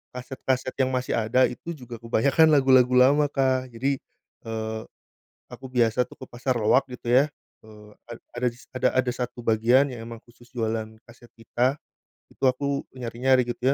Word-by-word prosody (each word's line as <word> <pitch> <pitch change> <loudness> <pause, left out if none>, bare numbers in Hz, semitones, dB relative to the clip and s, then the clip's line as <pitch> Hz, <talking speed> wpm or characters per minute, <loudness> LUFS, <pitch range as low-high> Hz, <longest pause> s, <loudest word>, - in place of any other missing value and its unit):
kaset-kaset 130 0 -3
yang 130 0 +1
masih 125 -1 -1
ada 120 +4 +2
itu 170 +7 -7
juga 120 -4 -10
kebanyakan 135 +7 +3
lagu-lagu 130 -2 +5
lama, 140 +4 +5
Kak. 130 -3 0
Jadi, 135 +3 0 0.5
eee, 110 0 -4 0.7
aku 130 - -10
biasa 120 0 +2
tuh - - -15
ke - - -7
pasar 125 +1 -2
loak 110 +5 +3
gitu 120 -1 -8
ya, 135 +4 +5 0.4
eee, 105 -1 -15 0.2
ad 120 -1 -9 0.2
ada 125 +1 -1
dis 120 +2 -17
ada 130 - +2
ada 130 -1 +2
satu 125 -1 -5
bagian 115 +5 +4
yang 120 -2 -8
memang 115 -1 -8
khusus 120 0 -20
jualan 110 -1 -2 0.2
kaset 120 0 -17
pita. 120 +3 0 0.6
Itu - - -4
aku 140 +2 0
menyari-nyari 125 +1 +1
gitu 125 +3 0
125 Hz, 165 wpm, -25 LUFS, 115-130 Hz, 0.7 s, lagu-lagu